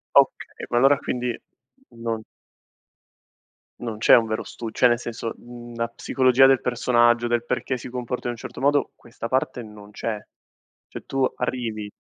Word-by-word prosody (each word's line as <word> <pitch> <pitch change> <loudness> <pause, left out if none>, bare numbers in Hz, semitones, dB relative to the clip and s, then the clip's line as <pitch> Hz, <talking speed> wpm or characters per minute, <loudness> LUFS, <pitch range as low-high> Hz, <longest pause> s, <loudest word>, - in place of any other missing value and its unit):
Okay, - - +2
ma 120 - +3
allora 135 +2 +5
quindi 125 -1 -3 0.5
non 115 -1 -4 1.6
non 115 -3 -4
c'è - - +7
un 115 - +5
vero 110 0 -2
stu 115 -2 -7
cioè 125 - +4
nel 120 -1 +2
senso, 115 -1 -5
mhmm, 120 0 -11
la 115 0 -1
psicologia 130 +2 +4
del 135 -1 +4
personaggio, 120 -1 +3
del 120 0 0
perché 125 +1 -1
si - - -8
comporta 125 0 -4
in 120 - 0
un - - -8
certo - - -8
modo, 145 +1 +2
questa 115 0 -8
parte 130 -1 0
non 105 -1 -12
c'è. 110 +1 -3 0.7
Cioè - - -9
tu 135 -1 0
arrivi 115 -4 -3
120 Hz, 165 wpm, -24 LUFS, 115-125 Hz, 1.6 s, c'è